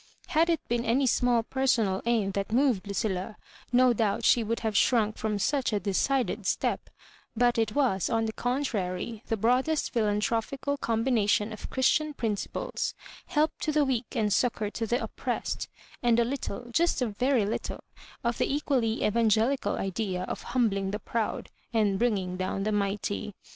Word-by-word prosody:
Had 325 Hz, +2 st, +3 dB
it 330 Hz, -2 st, 0 dB
been 235 Hz, 0 st, 0 dB
any 245 Hz, +4 st, +2 dB
small 245 Hz, -1 st, +2 dB
personal 230 Hz, -7 st, +1 dB
aim 220 Hz, -5 st, +2 dB
that 200 Hz, +1 st, -3 dB
moved 240 Hz, -5 st, +2 dB
Lu 200 Hz, -, -4 dB
cilla, 190 Hz, 0 st, -2 dB, 0.4 s
no 250 Hz, 0 st, +5 dB
doubt 215 Hz, -3 st, 0 dB
she 235 Hz, -, +5 dB
would 230 Hz, +1 st, -2 dB
have 220 Hz, -2 st, -2 dB
shrunk 220 Hz, -1 st, +3 dB
from 215 Hz, -1 st, -2 dB
such 270 Hz, +5 st, 0 dB
a 210 Hz, -, +1 dB
decided 235 Hz, +7 st, 0 dB
step; -, -, -1 dB, 0.5 s
but 240 Hz, 0 st, +3 dB
it 220 Hz, -2 st, 0 dB
was, 245 Hz, -10 st, +2 dB
on 225 Hz, -1 st, +1 dB
the 220 Hz, -, -3 dB
contrary, 225 Hz, -5 st, -2 dB
the 225 Hz, -, 0 dB
broadest 255 Hz, +8 st, +1 dB
philanthropical 225 Hz, +5 st, 0 dB
combination 225 Hz, -3 st, +1 dB
of 215 Hz, -, -8 dB
Christian 300 Hz, +3 st, +1 dB
principles, 225 Hz, -, -2 dB, 0.3 s
help 305 Hz, +1 st, +2 dB
to 310 Hz, -, -1 dB
the 300 Hz, -1 st, +3 dB
weak 255 Hz, -3 st, -2 dB
and 210 Hz, -2 st, +1 dB
succour 215 Hz, -1 st, 0 dB
to 225 Hz, 0 st, -3 dB
the 240 Hz, +4 st, 0 dB
oppressed, -, -, -3 dB, 0.3 s
and 235 Hz, -1 st, +3 dB
a 235 Hz, -, +3 dB
little, 245 Hz, -2 st, -4 dB
just 330 Hz, -1 st, +2 dB
a -, -, +2 dB
very 245 Hz, +1 st, +1 dB
little, 210 Hz, -, -4 dB, 0.4 s
of 235 Hz, 0 st, -1 dB
the -, -, +1 dB
equally 265 Hz, -6 st, 0 dB
Evangelical 230 Hz, +4 st, +2 dB
idea 190 Hz, -1 st, -2 dB
of -, -, -5 dB, 0.2 s
humbling 200 Hz, -5 st, +2 dB
the 205 Hz, -, -2 dB
proud 225 Hz, -2 st, -3 dB, 0.2 s
and 205 Hz, -3 st, +2 dB
bringing 195 Hz, -6 st, 0 dB
down 185 Hz, +1 st, -2 dB
the 215 Hz, -, 0 dB
mighty. 205 Hz, 0 st, -2 dB
225 Hz, 165 wpm, -28 LUFS, 205-255 Hz, 0.5 s, no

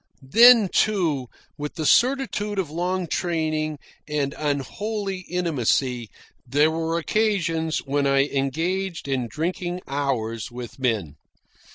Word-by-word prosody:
Then, 235 Hz, -1 st, +8 dB
too, 170 Hz, -13 st, +1 dB, 0.3 s
with 150 Hz, 0 st, -5 dB
the 160 Hz, -3 st, -3 dB
certitude 240 Hz, -, +2 dB
of 180 Hz, -6 st, -2 dB
long 180 Hz, +3 st, -1 dB
training 155 Hz, -2 st, -1 dB, 0.3 s
and 145 Hz, -2 st, -1 dB
unholy 190 Hz, -, -3 dB
intimacy, 130 Hz, -8 st, 0 dB, 0.3 s
there 145 Hz, +5 st, +2 dB
were 165 Hz, +1 st, -1 dB
occasions 170 Hz, -5 st, 0 dB
when 140 Hz, 0 st, +1 dB
I 135 Hz, 0 st, +4 dB
engaged 165 Hz, +6 st, -2 dB
in 130 Hz, -3 st, -1 dB
drinking 175 Hz, +5 st, -3 dB
bouts 125 Hz, -6 st, -2 dB
with 120 Hz, 0 st, -9 dB
men. 105 Hz, -, -1 dB
155 Hz, 110 wpm, -24 LUFS, 135-185 Hz, 0.3 s, Then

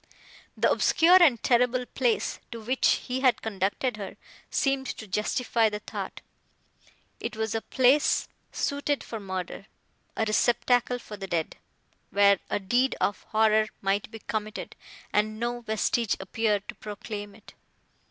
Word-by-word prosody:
The -, -, +3 dB
obscure 355 Hz, +3 st, +5 dB
and 270 Hz, -10 st, +5 dB
terrible 250 Hz, 0 st, +3 dB
place, 245 Hz, -2 st, 0 dB
to 230 Hz, -, -6 dB
which 250 Hz, +4 st, +1 dB, 0.2 s
he 255 Hz, +1 st, -2 dB
had 260 Hz, -2 st, +3 dB
conducted 215 Hz, +3 st, -1 dB
her, 200 Hz, -2 st, -7 dB, 0.3 s
seemed 275 Hz, -1 st, 0 dB
to 220 Hz, -, -6 dB
justify 220 Hz, +3 st, +1 dB
the 210 Hz, -, -4 dB
thought; -, -, -7 dB, 1.0 s
it -, -, -4 dB
was 220 Hz, -1 st, -1 dB
a 225 Hz, -, -1 dB
place 265 Hz, +5 st, +3 dB, 0.2 s
suited 285 Hz, 0 st, -1 dB
for 225 Hz, -, -6 dB
murder, 190 Hz, 0 st, -5 dB, 0.5 s
a 220 Hz, -, +1 dB
receptacle 245 Hz, +3 st, +2 dB
for 215 Hz, -3 st, -10 dB
the 195 Hz, -1 st, -6 dB
dead, 165 Hz, -3 st, -2 dB, 0.5 s
where 200 Hz, 0 st, +5 dB
a -, -, 0 dB
deed 245 Hz, +7 st, +1 dB
of 205 Hz, -, 0 dB
horror 220 Hz, 0 st, +3 dB
might 195 Hz, +1 st, 0 dB
be 225 Hz, -, -8 dB
committed, 215 Hz, -1 st, -5 dB, 0.4 s
and 215 Hz, +1 st, +1 dB
no 240 Hz, +1 st, -2 dB
vestige 220 Hz, 0 st, 0 dB
appear 210 Hz, +1 st, 0 dB
to -, -, -9 dB
proclaim 205 Hz, -1 st, -7 dB
it. 220 Hz, -, -16 dB
220 Hz, 140 wpm, -27 LUFS, 205-250 Hz, 1.0 s, obscure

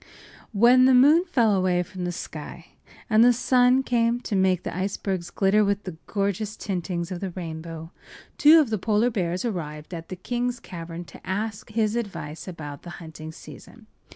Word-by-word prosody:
When 245 Hz, +4 st, +6 dB
the 260 Hz, 0 st, +6 dB
moon 300 Hz, +8 st, +6 dB
fell 235 Hz, -, +2 dB
away 185 Hz, -2 st, +2 dB
from 180 Hz, +1 st, -7 dB
the 175 Hz, -, -2 dB
sky 175 Hz, -, -8 dB, 0.4 s
and 220 Hz, 0 st, +5 dB
the 245 Hz, -, +7 dB
sun 250 Hz, +1 st, +3 dB
came 235 Hz, -1 st, +1 dB
to 210 Hz, -, -3 dB
make 190 Hz, -2 st, +2 dB
the -, -, -5 dB
icebergs 190 Hz, -1 st, -3 dB
glitter 200 Hz, +3 st, +3 dB
with 200 Hz, 0 st, 0 dB
the 185 Hz, -4 st, -7 dB
gorgeous 200 Hz, +1 st, -2 dB
tintings 180 Hz, -2 st, -3 dB
of 180 Hz, -, -4 dB
the 195 Hz, -, -3 dB
rainbow, 165 Hz, -2 st, -7 dB, 0.5 s
two 310 Hz, +2 st, +8 dB
of 280 Hz, -8 st, +1 dB
the 215 Hz, -, 0 dB
polar 220 Hz, +4 st, +2 dB
bears 180 Hz, -2 st, -2 dB
arrived 155 Hz, -7 st, -5 dB
at 165 Hz, -1 st, -7 dB
the 185 Hz, -, -5 dB
king’s 245 Hz, +5 st, -3 dB
cavern 170 Hz, -3 st, -8 dB
to -, -, -14 dB
ask 205 Hz, +4 st, -4 dB
his 215 Hz, 0 st, 0 dB
advice 195 Hz, -10 st, -5 dB
about 150 Hz, -5 st, -7 dB
the 175 Hz, -, -10 dB
hunting 160 Hz, -1 st, -9 dB
season. -, -, -13 dB
195 Hz, 180 wpm, -25 LUFS, 175-235 Hz, 0.5 s, two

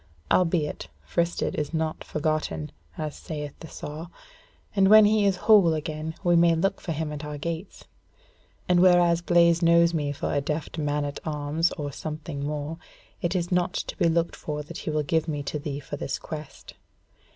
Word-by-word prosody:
Albeit, 165 Hz, -, +1 dB, 0.2 s
fristed 170 Hz, -, 0 dB
is 150 Hz, +2 st, -3 dB
not 160 Hz, 0 st, -2 dB
forgotten, 150 Hz, -, -2 dB, 0.3 s
as 155 Hz, -1 st, -4 dB
saith 150 Hz, -3 st, -6 dB
the 160 Hz, -, -9 dB
saw; 155 Hz, +2 st, -7 dB, 0.7 s
and 195 Hz, -1 st, +5 dB
when 215 Hz, 0 st, +9 dB
he 210 Hz, -1 st, +4 dB
is 195 Hz, -, +2 dB
whole 195 Hz, -7 st, +6 dB
again, 155 Hz, +1 st, -4 dB
we 175 Hz, -2 st, +4 dB
may 170 Hz, 0 st, +5 dB
look 180 Hz, +4 st, 0 dB
for 170 Hz, -, -4 dB
him 155 Hz, -1 st, -2 dB
at 150 Hz, 0 st, -6 dB
our 150 Hz, 0 st, -5 dB
gates; 170 Hz, +5 st, -5 dB, 0.8 s
and 180 Hz, -1 st, +4 dB
whereas 175 Hz, -2 st, +5 dB
Blaise 170 Hz, -1 st, +4 dB
knows 170 Hz, 0 st, +5 dB
me 145 Hz, -3 st, -1 dB
for 145 Hz, -, -3 dB
a 145 Hz, -, +1 dB
deft 150 Hz, +3 st, -3 dB
man 145 Hz, -1 st, 0 dB
at 145 Hz, 0 st, -5 dB
arms 155 Hz, +2 st, 0 dB
or 145 Hz, -2 st, -4 dB
something 150 Hz, 0 st, -6 dB
more, 150 Hz, +2 st, -4 dB, 0.4 s
it 175 Hz, +2 st, -1 dB
is 175 Hz, -1 st, -1 dB
not 180 Hz, 0 st, +1 dB
to -, -, -3 dB
be 170 Hz, -, +2 dB
looked 170 Hz, +1 st, 0 dB
for 150 Hz, -1 st, -5 dB
that 150 Hz, -, -8 dB
he -, -, -4 dB
will 155 Hz, -1 st, 0 dB
give 160 Hz, +2 st, 0 dB
me 145 Hz, -2 st, -2 dB
to 150 Hz, -, -3 dB
thee 145 Hz, -1 st, -4 dB
for 145 Hz, 0 st, -7 dB
this 135 Hz, -, -3 dB
quest. 150 Hz, -3 st, -9 dB
160 Hz, 185 wpm, -26 LUFS, 150-170 Hz, 0.8 s, when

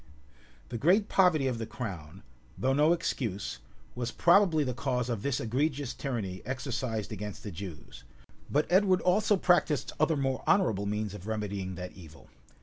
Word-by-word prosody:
The 120 Hz, -, -4 dB
great 195 Hz, -, +3 dB
poverty 180 Hz, -7 st, +4 dB
of 125 Hz, -3 st, -1 dB
the 115 Hz, -, -4 dB
crown, 95 Hz, -7 st, -7 dB, 0.3 s
though 130 Hz, +1 st, +1 dB
no 150 Hz, +4 st, +4 dB
excuse, 115 Hz, -, -2 dB, 0.3 s
was 120 Hz, -1 st, -3 dB
probably 175 Hz, 0 st, +4 dB
the 130 Hz, -2 st, -2 dB
cause 125 Hz, -1 st, -1 dB
of 115 Hz, -4 st, -2 dB
this 140 Hz, +1 st, 0 dB
egregious 140 Hz, +3 st, -1 dB
tyranny 105 Hz, -9 st, -4 dB
exercised 125 Hz, -3 st, -3 dB
against 105 Hz, 0 st, -6 dB
the 105 Hz, -, -5 dB
Jews; 85 Hz, -2 st, -9 dB, 0.5 s
but 150 Hz, +2 st, +2 dB
Edward 190 Hz, 0 st, +4 dB
also 205 Hz, +3 st, +3 dB
practised 175 Hz, -5 st, +2 dB
other 155 Hz, 0 st, +3 dB
more 135 Hz, -1 st, -1 dB
honorable 110 Hz, -, +2 dB
means 105 Hz, 0 st, -2 dB
of 105 Hz, -1 st, -9 dB
remedying 100 Hz, -4 st, -3 dB
that 90 Hz, 0 st, -6 dB
evil. 80 Hz, -4 st, -15 dB
125 Hz, 155 wpm, -30 LUFS, 105-155 Hz, 0.5 s, poverty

